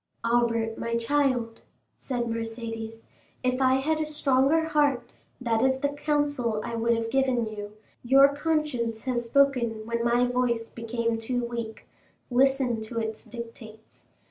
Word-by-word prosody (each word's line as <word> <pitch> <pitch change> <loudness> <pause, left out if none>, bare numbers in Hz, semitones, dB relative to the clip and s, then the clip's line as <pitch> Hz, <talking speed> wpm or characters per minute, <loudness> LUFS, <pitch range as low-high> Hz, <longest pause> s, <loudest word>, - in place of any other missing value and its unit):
"Albert, 230 -1 +1
my 230 0 -2
child," 245 -2 0 0.3
said 245 -3 -3
Mercédès, 225 -1 -5 0.4
"if 255 +1 +1
I 260 0 +4
had 310 +4 0
a - - 0
stronger 290 +1 +2
heart, 290 -6 +1 0.3
that 230 -3 0
is 265 +1 +3
the 285 +2 0
counsel 285 -6 0
I 235 -1 -4
would 230 +1 +2
have 225 0 -3
given 260 -3 +2
you; 210 -1 -7 0.3
your 270 +3 +6
conscience 290 -8 -1
has 245 -2 -1
spoken 235 -4 +2
when 235 0 -2
my 240 +1 +3
voice 245 -2 0
became 230 0 -2
too 245 +2 -2
weak; 235 -2 -6 0.5
listen 260 -2 +2
to 220 +2 -7
its 220 -1 -4
dictates. 225 -1 -11
240 Hz, 145 wpm, -27 LUFS, 230-265 Hz, 0.5 s, your